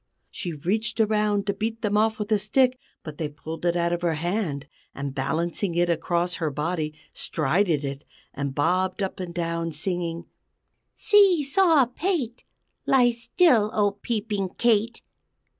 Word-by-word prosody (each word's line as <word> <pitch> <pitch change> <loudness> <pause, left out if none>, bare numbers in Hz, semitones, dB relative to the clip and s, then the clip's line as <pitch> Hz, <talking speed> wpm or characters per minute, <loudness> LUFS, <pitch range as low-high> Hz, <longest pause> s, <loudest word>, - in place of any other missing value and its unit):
She 180 -9 -5
reached 205 +11 -2
around 210 -2 +2
to 200 - 0
beat 225 +3 -4
them 210 -1 +1
off 220 +1 +2
with 210 0 -5
a 215 - +4
stick, 255 +5 +2 0.2
but 155 -2 -9
they 155 -2 -2
pulled 160 +2 -8
it 170 0 +2
out 170 0 +1
of 175 - -2
her 170 -2 +1
hand; 165 -3 -2 0.3
and, 140 -1 -4
balancing 170 +6 -2
it 175 0 +2
across 170 +2 -1
her 160 - +1
body, 155 +1 -2 0.2
strided 155 0 0
it, 140 +1 -5 0.3
and 140 -1 -4
bobbed 185 +5 +1
up 190 - -4
and 180 -2 -5
down, 170 -1 -2
singing: 170 +1 -3 0.7
"_See 390 -7 +5
saw 315 -2 +4
pate! 255 - -2 0.4
Lie 250 -2 +5
still 235 - +3
old 205 -1 +1
Peeping 210 -5 -2
Kate! 230 0 +1
190 Hz, 155 wpm, -25 LUFS, 165-225 Hz, 0.7 s, See